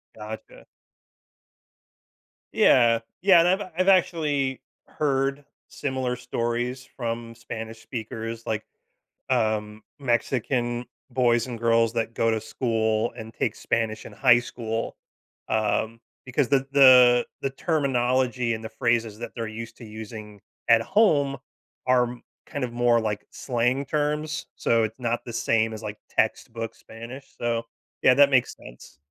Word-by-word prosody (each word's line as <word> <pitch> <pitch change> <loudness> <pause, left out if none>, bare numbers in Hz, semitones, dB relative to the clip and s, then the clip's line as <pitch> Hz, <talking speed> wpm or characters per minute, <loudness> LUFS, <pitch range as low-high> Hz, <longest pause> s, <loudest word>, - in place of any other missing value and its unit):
Gotcha. 110 0 -9 1.9
Yeah. 115 -2 +5 0.2
Yeah, 185 -2 +7
and 170 - +4
I've 190 0 0
I've 185 +1 +2
actually 150 -8 +2 0.3
heard 135 -1 -1 0.2
similar 130 -2 -2
stories 125 +1 -3
from 115 -2 -4
Spanish 115 -1 -7
speakers, 115 0 -6
like, 110 -1 -2 0.7
um, 110 -3 0 0.2
Mexican 120 -1 0 0.3
boys 120 -2 +2
and 120 -2 -6
girls 115 -1 +3
that 115 -1 -2
go 115 0 +2
to 110 -1 -1
school 110 -1 0
and 110 0 -8
take - - -1
Spanish 110 -2 -2
in - - -9
high 125 -3 +5
school. 115 -2 -4 0.5
Um, 110 +1 0 0.3
because 130 +1 0
the 135 -1 +3
the 125 -3 +7 0.2
the 135 - -1
terminology 130 -5 +1
and 110 0 -5
the 110 - -5
phrases 115 -1 0
that 120 -1 -6
they're 115 - -3
used 115 +1 -8
to 115 - -11
using 105 -1 -9 0.3
at 115 -1 +7
home 145 - +3 0.5
are 125 -1 +2 0.3
kind 145 - -4
of 120 -1 -3
more 120 -1 +3
like 105 -2 -3
slang 125 +2 0
terms. 150 +1 -2
So 115 -1 +2
it's 110 +3 -4
not 120 -1 -1
the 120 - -7
same 115 -1 +1
as, 110 - -7
like, 105 0 -5
textbook 115 0 -1
Spanish. 120 +5 -10
So, 115 -1 -1 0.4
yeah, 130 - +7
that 140 +1 +6
makes 130 -2 +2
sense. 60 +3 -14
120 Hz, 135 wpm, -25 LUFS, 115-130 Hz, 1.9 s, Yeah